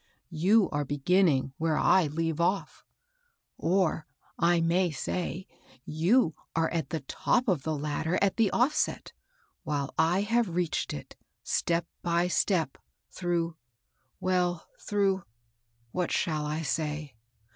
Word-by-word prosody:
You 190 +6 +4
are 145 0 0
beginning 145 -1 +2
where 160 -1 +1
1 155 -3 +3
leave 165 0 -1
off; 190 +3 -1 0.8
or, 170 -3 +1 0.3
I 170 0 +4
may 175 +2 +2
say, 175 +4 -3 0.4
you 165 +4 +2 0.2
are 165 0 +1
at 165 -1 -2
the 160 - -3
top 245 - 0
of 180 -9 +2
the 155 +1 -2
ladder 150 +4 -1
at 200 -1 +1
the 225 -3 +4
ofiset, 290 +6 +1 0.5
while 140 -2 -3
I 170 +4 +3
have 220 -4 +1
reached 175 -3 -1
it, 75 - -8 0.3
step 170 0 0 0.2
by 175 +1 +1
step, 170 -6 +1 0.3
through 170 -2 -1 0.3
— 130 - -47
well, 180 -2 0
through 195 -2 0 0.3
— 115 0 -42
what 180 -2 -1
shall 155 -2 0
I 155 +2 -2
say 150 -1 -2
170 Hz, 135 wpm, -29 LUFS, 150-185 Hz, 0.8 s, You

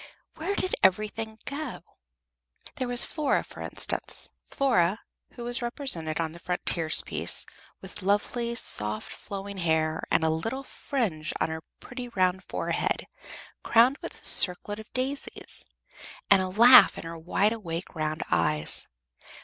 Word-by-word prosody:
Where 400 - -3
did 370 - -2
everything 215 +3 +1
go? 285 -2 -6 0.9
There 255 - -2
was 245 0 +10
Flora, 305 -2 0
for - - -12
instance - - -3 0.2
Flora 215 -7 +1 0.3
who 240 - -8
was 240 +1 -2
represented 235 - -3
on 160 -1 -1
the 170 - -12
frontispiece 170 -2 0 0.4
with - - -8
lovely, 235 +5 0
soft, 105 - -1
flowing 200 -1 -7
hair, 160 -2 0
and 165 - +2
a 160 - +2
little 225 +12 -3
fringe 210 - -3
on - - 0
her 160 0 -5 0.2
pretty 250 -1 -7
round 185 -3 0
forehead, - - -2 0.6
crowned 245 +5 +4
with - - -8
a - - -10
circlet 205 +3 +4
of 220 - -12
daisies, 265 +2 -4 0.7
and 195 -1 +7
a 185 - -2
laugh 235 +6 +8
in - - -7
her 165 0 -7
wide 185 +6 0
awake 175 -6 -6
round 155 -1 -3
eyes. 75 -3 0
200 Hz, 140 wpm, -27 LUFS, 165-240 Hz, 0.9 s, was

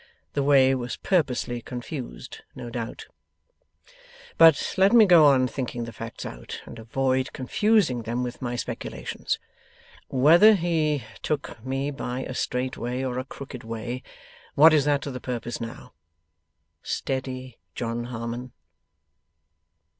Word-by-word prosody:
The 140 - 0
way 135 -2 +5
was 125 -2 -3
purposely 125 -9 0
confused, 125 +3 -7 0.2
no 120 - -7
doubt. 115 -1 -5 1.3
'But 165 -3 +6
let 195 +3 +4
me 230 -3 +8
go 170 -5 +7
on 130 -2 +4
thinking 125 -1 -4
the 115 0 -7
facts 115 0 -7
out, - - -7
and 115 - -10
avoid 130 +3 0
confusing 155 - +2
them 120 +2 -2
with 125 -1 -6
my 120 -1 -2
speculations. - - -4 0.7
Whether 170 +11 +6
he 160 -5 0 0.2
took 140 -7 -3
me 135 +2 -2
by 125 -2 -4
a 130 - -5
straight 125 +1 -2
way 125 +2 -3
or 125 -1 -2
a - - -3
crooked 135 -2 -9
way, 115 +2 -5 0.5
what 155 +2 +8
is 145 -3 +4
that 145 -1 +2
to 140 - -4
the 125 -1 -6
purpose 120 -1 -4
now? 115 0 -8 0.9
Steady, 130 -2 -4 0.2
John 120 0 -3
Harmon. 120 +1 -5
130 Hz, 135 wpm, -25 LUFS, 120-145 Hz, 1.3 s, me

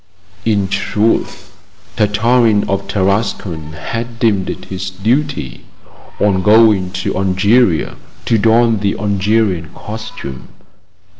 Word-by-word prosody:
In 105 -3 +1
truth, 100 +3 -1 0.4
Tartarin 110 0 +2
of 100 -1 -2
Tarascon 95 -5 -1
had 115 +9 -5
deemed 105 -6 +1
it - - -6
his 95 0 -5
duty, 115 - -2 0.5
on 100 -2 +2
going 105 -2 +4 0.2
to - - -1
Algeria, 95 +1 +2 0.3
to 115 -2 +2
don 115 0 +3
the 100 0 -1
Algerian 100 -4 0
costume. 105 -11 -8
105 Hz, 100 wpm, -16 LUFS, 95-115 Hz, 0.5 s, going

